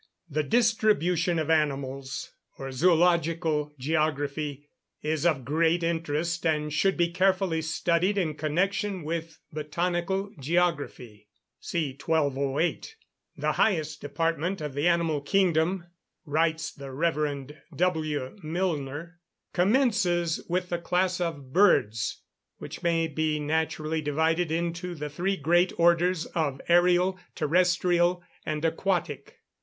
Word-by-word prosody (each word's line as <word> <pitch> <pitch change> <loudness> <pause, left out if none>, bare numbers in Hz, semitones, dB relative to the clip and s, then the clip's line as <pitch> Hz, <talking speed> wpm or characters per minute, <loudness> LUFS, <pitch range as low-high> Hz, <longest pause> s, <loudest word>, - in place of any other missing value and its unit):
The 155 -1 -1
distribution 195 -4 +2
of 160 0 0
animals, 140 -3 -1 0.3
or 135 0 -6
Zoological 165 -1 +2
Geography, 145 0 -1 0.4
is 155 +1 +1
of 140 -7 0
great 165 +4 +2
interest, 165 0 -1
and 150 -2 0
should 195 +5 +2
be 170 -1 +2
carefully 185 -2 +1
studied 170 +4 +1
in 165 -5 0
connection 185 +5 -1
with 165 0 -4 0.2
Botanical 175 +5 -2
Geography 145 -9 -1 0.3
(see 155 -6 -2
1208). 145 - 0 0.4
The - - 0
highest 155 -7 0
department 165 +5 -1
of 150 -3 -5
the 145 +4 +1
animal 165 -4 +2
kingdom 175 +2 +1 0.4
(writes 160 +1 0
the 140 -1 -9
Rev. 145 -2 -1 0.2
W. 160 -2 -1
Milner) 165 -1 -3 0.3
commences 185 - +2
with 180 +1 -1
the 175 - -1
class 180 +1 0
of 145 -6 -4
Birds, 115 - +3 0.3
which - - -8
may 165 -1 +2
be 155 0 -1
naturally 155 +1 -1
divided 160 +3 +1
into 170 +2 -2
the 150 -1 -5
three 190 +6 -1
great 175 +4 +3
orders 170 0 +3
of 145 -5 -2
ærial, 180 +2 +4 0.2
terrestrial, 175 +2 +2 0.2
and 155 +1 -2
aquatic. 165 -3 -1
165 Hz, 115 wpm, -27 LUFS, 150-175 Hz, 0.4 s, ærial